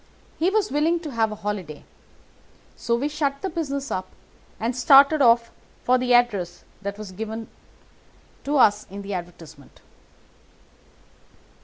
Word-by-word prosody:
He 335 Hz, +3 st, +3 dB
was 420 Hz, 0 st, 0 dB
very 295 Hz, -, -1 dB
willing 335 Hz, +2 st, +2 dB
to 310 Hz, -4 st, -6 dB
have 225 Hz, -3 st, 0 dB
a -, -, -5 dB
holiday, 200 Hz, -8 st, -5 dB, 0.9 s
so 235 Hz, -, -1 dB
we 260 Hz, +5 st, -1 dB
shut 290 Hz, -2 st, -2 dB
the 385 Hz, -, -2 dB
business 280 Hz, -4 st, -4 dB
up 185 Hz, 0 st, -3 dB, 0.5 s
and 230 Hz, +3 st, -2 dB
started 280 Hz, +4 st, +6 dB
off 235 Hz, -2 st, +4 dB, 0.3 s
for 255 Hz, +1 st, +3 dB
the 250 Hz, 0 st, -1 dB
address 205 Hz, -8 st, +2 dB, 0.2 s
that 200 Hz, 0 st, -5 dB
was 210 Hz, -3 st, -8 dB
given 220 Hz, +3 st, -6 dB, 1.0 s
us 215 Hz, -8 st, +3 dB
in 200 Hz, +1 st, -8 dB
the 200 Hz, 0 st, -5 dB
advertisement. 165 Hz, -5 st, -9 dB
235 Hz, 140 wpm, -23 LUFS, 200-280 Hz, 1.0 s, started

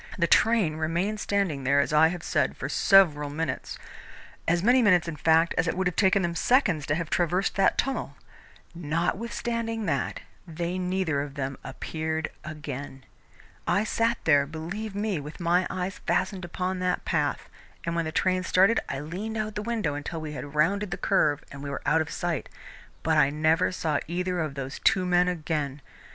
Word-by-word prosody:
The 170 Hz, -, +3 dB
train 205 Hz, -5 st, +3 dB
remained 170 Hz, +7 st, -1 dB
standing 195 Hz, -10 st, -1 dB
there, 140 Hz, +2 st, +3 dB
as 140 Hz, -, +1 dB
I 155 Hz, +1 st, +6 dB
have 175 Hz, 0 st, -4 dB
said, -, -, 0 dB
for -, -, -4 dB
several 155 Hz, -7 st, +4 dB
minutes 160 Hz, +3 st, -4 dB, 0.7 s
as 170 Hz, +1 st, +2 dB
many 250 Hz, +4 st, +5 dB
minutes, 180 Hz, -6 st, +4 dB
in 165 Hz, -, -4 dB
fact, 165 Hz, +2 st, +3 dB
as 165 Hz, -, +2 dB
it 165 Hz, -, -1 dB
would 190 Hz, -, 0 dB
have 180 Hz, -2 st, 0 dB
taken 190 Hz, 0 st, +3 dB
them 170 Hz, 0 st, -1 dB
seconds 175 Hz, -, +2 dB
to 145 Hz, -, +1 dB
have 165 Hz, -1 st, -4 dB
traversed 180 Hz, +2 st, +1 dB
that 195 Hz, -, +3 dB
tunnel. 270 Hz, -, -2 dB, 0.6 s
Notwithstanding 225 Hz, +7 st, -2 dB
that, 140 Hz, -7 st, -1 dB, 0.3 s
they 170 Hz, +2 st, -3 dB
neither 180 Hz, -5 st, 0 dB
of 140 Hz, -1 st, -6 dB
them 135 Hz, -1 st, -3 dB
appeared 160 Hz, +4 st, -4 dB
again. 145 Hz, -3 st, -7 dB, 0.6 s
I 205 Hz, -, +2 dB
sat 230 Hz, +1 st, +1 dB
there, 145 Hz, -3 st, +4 dB
believe 180 Hz, +7 st, -6 dB
me, 205 Hz, -4 st, -1 dB
with 150 Hz, +5 st, -9 dB
my 175 Hz, +1 st, +2 dB
eyes 185 Hz, +1 st, -4 dB
fastened 185 Hz, -3 st, 0 dB
upon 185 Hz, +2 st, -3 dB
that 180 Hz, 0 st, -1 dB
path, -, -, -1 dB, 0.4 s
and 170 Hz, 0 st, -2 dB
when 170 Hz, -1 st, 0 dB
the 160 Hz, -, -3 dB
train 185 Hz, +2 st, +1 dB
started 190 Hz, +4 st, +4 dB
I 135 Hz, -, -3 dB
leaned 195 Hz, +9 st, -5 dB
out 215 Hz, 0 st, -1 dB
of -, -, -13 dB
the 210 Hz, -, -3 dB
window 215 Hz, -9 st, -1 dB
until 145 Hz, +3 st, -5 dB
we 155 Hz, -1 st, -6 dB
had 145 Hz, +1 st, -7 dB
rounded 200 Hz, +7 st, +2 dB
the 190 Hz, -, -4 dB
curve 145 Hz, -7 st, +2 dB
and 140 Hz, -, -9 dB
we 140 Hz, -, -5 dB
were 140 Hz, -, -5 dB
out 160 Hz, +1 st, +3 dB
of 160 Hz, -, -4 dB
sight, 175 Hz, -4 st, -3 dB, 0.5 s
but 160 Hz, -1 st, +3 dB
I 140 Hz, -, +5 dB
never 155 Hz, +5 st, +2 dB
saw 155 Hz, -5 st, -1 dB
either 180 Hz, +2 st, -2 dB
of 155 Hz, -4 st, -2 dB
those 135 Hz, 0 st, -5 dB
two 190 Hz, -4 st, +3 dB
men 180 Hz, 0 st, +3 dB
again. 155 Hz, -5 st, -2 dB
170 Hz, 190 wpm, -27 LUFS, 150-190 Hz, 0.7 s, I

